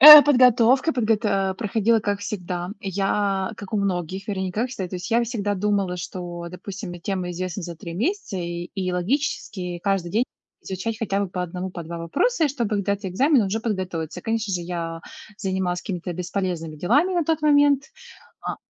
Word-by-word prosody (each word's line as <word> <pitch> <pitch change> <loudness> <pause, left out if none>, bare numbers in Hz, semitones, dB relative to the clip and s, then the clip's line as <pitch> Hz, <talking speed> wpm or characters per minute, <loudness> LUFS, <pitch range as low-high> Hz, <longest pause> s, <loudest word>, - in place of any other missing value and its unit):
Э, 300 +1 +14
подготовка 255 +1 +5
подгота 210 -5 +1
проходила, 220 +2 +2
как 205 -1 -1
всегда. 180 -3 -4
Я, 195 0 0
как 205 0 -9
у - - +2
многих, 190 0 -2
вернее, 190 -2 -1
ну, 180 - -4
как 230 +6 0
всегда, 190 -8 -4
то 185 - -4
есть 180 +6 -6
я 235 +1 +4
всегда 210 -4 -1
думала, 200 -2 0
что, 175 -1 -6
допустим, 190 +1 -7
мне 175 - -8
тема 185 -1 -2
известна 185 +2 -4
за 170 0 -5
3 165 +1 -7
месяца, 325 - -1
и 175 0 -4
и 185 -2 -1
логически 180 - -1
каждый 185 -2 0
день 230 +4 +3 0.4
изучать 195 +4 -3
хотя 200 -3 0
бы 200 - -1
по 180 0 -3
1, 180 +2 -4
по 175 - -6
2 170 +1 -6
вопроса, 325 - +1
и - - +3
чтобы 240 -6 -2
когда 200 0 +1
у - - -5
тя 195 -1 -5
экзамен, 260 - +4
и - - 0
уже 220 +4 -1
подготовиться. 185 -8 -3
Конечно 225 -3 -1
же, 175 - -1
я 170 -1 -4 0.4
занималась 185 -3 -1
какими-то 180 -2 -4
бесполезными 175 -3 -3
делами 280 - +3
на 345 -2 +1
тот 320 0 0
момент. 285 -2 +5 0.6
А, - - -3
195 Hz, 190 wpm, -24 LUFS, 180-225 Hz, 0.6 s, Э